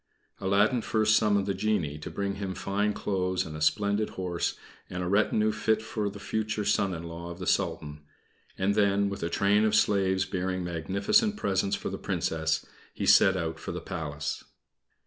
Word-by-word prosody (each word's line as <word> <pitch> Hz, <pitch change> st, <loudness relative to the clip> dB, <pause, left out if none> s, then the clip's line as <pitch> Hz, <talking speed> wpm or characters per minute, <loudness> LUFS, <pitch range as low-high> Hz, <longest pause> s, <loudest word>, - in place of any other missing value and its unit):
Aladdin 100 Hz, +5 st, +2 dB
first 110 Hz, -1 st, +2 dB
summoned 105 Hz, -3 st, +3 dB
the 100 Hz, -, 0 dB
genie 95 Hz, -7 st, -1 dB
to 75 Hz, -, -6 dB
bring 100 Hz, -1 st, -3 dB
him 95 Hz, -2 st, -4 dB
fine 105 Hz, +2 st, 0 dB
clothes 95 Hz, -3 st, -1 dB
and 75 Hz, -, -7 dB
a 75 Hz, -, -7 dB
splendid 100 Hz, +7 st, +1 dB
horse, 90 Hz, -2 st, -2 dB, 0.3 s
and 90 Hz, 0 st, -4 dB
a -, -, -2 dB
retinue 105 Hz, +2 st, +2 dB
fit 110 Hz, +1 st, +1 dB
for 110 Hz, -2 st, -3 dB
the 100 Hz, -, -10 dB
future 105 Hz, 0 st, -2 dB
son 95 Hz, -2 st, +1 dB
in 80 Hz, -, -6 dB
law 85 Hz, +1 st, -7 dB
of 85 Hz, -, -7 dB
the 90 Hz, -, -6 dB
Sultan; 75 Hz, -3 st, -1 dB, 0.6 s
and 95 Hz, +2 st, +1 dB
then, 100 Hz, -1 st, +2 dB
with 100 Hz, -, -6 dB
a 85 Hz, -, -1 dB
train 100 Hz, +4 st, +3 dB
of 110 Hz, -, +2 dB
slaves 95 Hz, -1 st, +2 dB
bearing 95 Hz, -1 st, -2 dB
magnificent 100 Hz, -, +1 dB
presents 100 Hz, -, 0 dB
for -, -, -5 dB
the -, -, -5 dB
Princess, 80 Hz, -1 st, -1 dB, 0.3 s
he -, -, -2 dB
set 95 Hz, -1 st, +6 dB
out 80 Hz, -2 st, -3 dB
for -, -, -5 dB
the -, -, -4 dB
Palace. 75 Hz, -2 st, -4 dB
100 Hz, 185 wpm, -28 LUFS, 85-105 Hz, 0.6 s, set